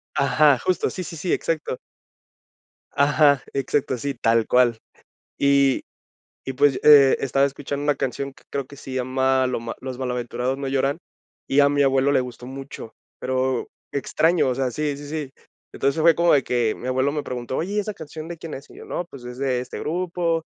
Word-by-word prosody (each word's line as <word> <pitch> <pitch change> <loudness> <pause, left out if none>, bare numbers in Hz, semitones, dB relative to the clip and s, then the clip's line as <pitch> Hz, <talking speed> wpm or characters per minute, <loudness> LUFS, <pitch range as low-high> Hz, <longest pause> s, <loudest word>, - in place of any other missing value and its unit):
Ajá, 140 +1 +4
justo, 185 - 0
sí, 185 - -5
sí, 165 - -8
sí, 165 +3 -3
exacto. 155 -5 -1 1.2
Ajá, 145 -1 +4
exacto, 135 -1 0
sí, 140 +4 -3
tal 115 -1 +2
cual. 125 -2 +4 0.6
Y 140 -1 +3 0.6
y, 135 - -4
pues, 140 0 +3
eh, 140 -3 +8
estaba 135 +1 +2
escuchando 140 +1 -4
una 145 - +3
canción 135 +1 -3
que - - -21
creo 140 -1 -3
que 140 - -13
se 135 - -10
llama 130 +1 +1
lo 125 - -2
ma 115 0 -6
Los 130 -1 -6
malaventurados 125 +1 -2
no 140 - -4
lloran, 135 +2 0 0.5
y 140 - +2
a 140 0 +6
mi 145 0 +2
abuelo 135 +1 +3
le 140 - +4
gustó 125 -1 -6
mucho. 135 -4 -9 0.2
Pero 130 -1 -1 0.2
extraño, 160 +3 +2
o 125 - -1
sea, 130 -1 -1
sí, 145 +1 -2
sí, 145 0 -9
sí. 150 -3 -4 0.4
Entonces, 140 +4 0
fue 165 0 +6
como 170 0 +4
de 140 - +4
que 120 -3 +1
mi 125 - -7
abuelo 130 +2 +1
me 150 -1 -2
preguntó: 125 0 -4
"Oye, 190 +5 -2
¿y 210 - +1
esa 210 +1 -3
canción 155 -2 -9
de 170 0 -7
quién 160 -1 -8
es?", 135 - -11
y - - -15
yo: - - -11
"No, 175 - -3
pues, 140 -7 -12
es 125 0 -8
de 130 -2 0
este 125 - -7
grupo", 170 0 -1
140 Hz, 200 wpm, -23 LUFS, 130-150 Hz, 1.2 s, eh